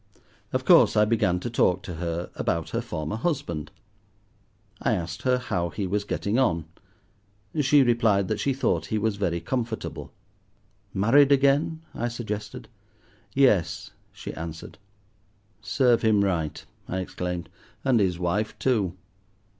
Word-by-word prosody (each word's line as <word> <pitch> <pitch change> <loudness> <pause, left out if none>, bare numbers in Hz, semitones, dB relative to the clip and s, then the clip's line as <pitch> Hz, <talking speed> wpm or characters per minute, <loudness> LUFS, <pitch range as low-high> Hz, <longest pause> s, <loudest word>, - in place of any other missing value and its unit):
Of - - -1
course, - - +6
I 105 - +6
began 105 -5 +1
to 120 - -3
talk 95 -5 +2
to 90 -3 -6
her 85 +1 -3
about 85 -1 -2
her - - -1
former 80 +7 -4
husband. 130 - -2 1.1
I - - +2
asked 85 -1 -3
her 125 -1 +2
how 90 -9 -2
he 95 +5 -3
was 100 +2 -1
getting 105 +3 -1
on. 85 -11 +1 1.0
She 145 0 +5
replied 115 -5 +2
that 110 +1 -2
she 140 - +1
thought 85 - 0
he 110 - -1
was 105 -1 0
very 85 -4 0
comfortable. 115 +1 -4 0.8
"Married 135 +9 +4
again?" 140 +4 +3
I 120 - -2
suggested. 110 -3 -5 0.7
"Yes," 125 - +2 0.2
she - - -8
answered. 80 +2 -8 0.8
"Serve 120 +2 +2
him 110 -3 +3
right," 85 -6 -2 0.2
I 95 - -3
exclaimed, 90 -2 -4 0.4
"and 130 -4 +4
his 95 -4 +1
wife 95 +5 -1
too." 105 -9 +1
105 Hz, 140 wpm, -26 LUFS, 90-120 Hz, 1.1 s, course